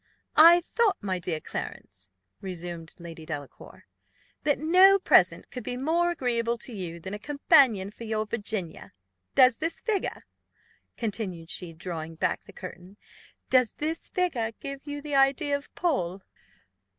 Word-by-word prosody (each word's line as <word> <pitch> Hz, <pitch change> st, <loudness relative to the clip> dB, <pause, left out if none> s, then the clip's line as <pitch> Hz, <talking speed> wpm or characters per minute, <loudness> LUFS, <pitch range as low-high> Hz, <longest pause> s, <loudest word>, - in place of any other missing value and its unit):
"I 340 Hz, +3 st, +8 dB
thought, 440 Hz, +4 st, +1 dB
my 185 Hz, -2 st, -1 dB
dear 170 Hz, -2 st, -2 dB
Clarence," 95 Hz, -9 st, -8 dB, 0.3 s
resumed 175 Hz, -3 st, -7 dB
Lady 165 Hz, -2 st, -10 dB
Delacour, 145 Hz, -3 st, -8 dB, 0.6 s
"that 290 Hz, -2 st, +1 dB
no 370 Hz, +6 st, +6 dB
present 385 Hz, -, +3 dB
could 250 Hz, -, -6 dB
be 245 Hz, +3 st, -4 dB
more 330 Hz, +6 st, +1 dB
agreeable 240 Hz, -7 st, -1 dB
to 240 Hz, +1 st, -7 dB
you 175 Hz, -4 st, -6 dB
than 190 Hz, +4 st, -7 dB
a 210 Hz, -, -5 dB
companion 235 Hz, -6 st, +3 dB
for 230 Hz, -, -11 dB
your 220 Hz, -1 st, -1 dB
Virginia. 205 Hz, -6 st, -4 dB, 0.4 s
Does 255 Hz, -2 st, +6 dB
this 325 Hz, +2 st, -2 dB
figure," 430 Hz, -4 st, -2 dB, 0.7 s
continued 195 Hz, -7 st, -4 dB
she, 180 Hz, -3 st, -5 dB
drawing 165 Hz, -2 st, -6 dB
back -, -, -1 dB
the -, -, -13 dB
curtain, 180 Hz, +1 st, -10 dB, 0.5 s
"does 255 Hz, -3 st, +4 dB
this 320 Hz, +2 st, -4 dB
figure 255 Hz, -12 st, -1 dB
give 275 Hz, 0 st, -6 dB
you 290 Hz, 0 st, -5 dB
the 300 Hz, -1 st, -5 dB
idea 275 Hz, +2 st, +3 dB
of 285 Hz, -, -7 dB
Paul?" 195 Hz, -, -1 dB
230 Hz, 145 wpm, -27 LUFS, 180-290 Hz, 0.7 s, I